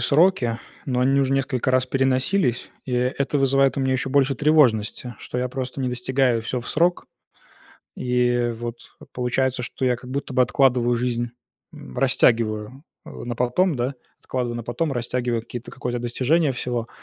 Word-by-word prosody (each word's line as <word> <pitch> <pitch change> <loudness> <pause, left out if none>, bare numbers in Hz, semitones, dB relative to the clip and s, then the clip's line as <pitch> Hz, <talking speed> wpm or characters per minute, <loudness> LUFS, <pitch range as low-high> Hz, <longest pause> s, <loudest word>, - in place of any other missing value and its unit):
сроки, 140 -7 +3 0.3
но 125 -2 0
они 135 +2 +3
уже 135 0 +1
несколько 130 -2 0
раз 130 0 +2
переносились, 130 - +1
и 130 - -5
это 130 +3 0
вызывает 135 -1 +3
у 140 - 0
меня 130 0 +1
еще 130 +1 -1
больше 135 0 +3
тревожности, 125 -5 +2
что 125 - -5
я 125 0 -1
просто 130 +1 -5
не 130 - 0
достигаю 125 -1 +1
всё 125 +2 -3
в 120 - -9
срок, 175 +3 +1 0.9
и 125 -1 +1
вот, 120 0 -5 0.4
получается, 125 +1 0
что 130 - -3
я 125 -1 +3
как 125 +1 -11
будто 140 0 -4
бы 130 - +4
откладываю 125 -1 +3
жизнь, 120 0 -1 0.4
м, 65 - -11
растягиваю, 115 0 +1 0.2
э, - - -9
на 120 0 -4
потом, 140 +9 +1
да, 125 +2 -1 0.3
откладываю 120 -2 -3
на 120 - -5
потом, 120 +7 -2
растягиваю 120 -1 -1
какие-то 120 +1 -8
какое-то 120 -1 -3
достижения 135 +6 +1
всего, 120 -1 -3
125 Hz, 165 wpm, -23 LUFS, 120-135 Hz, 0.9 s, бы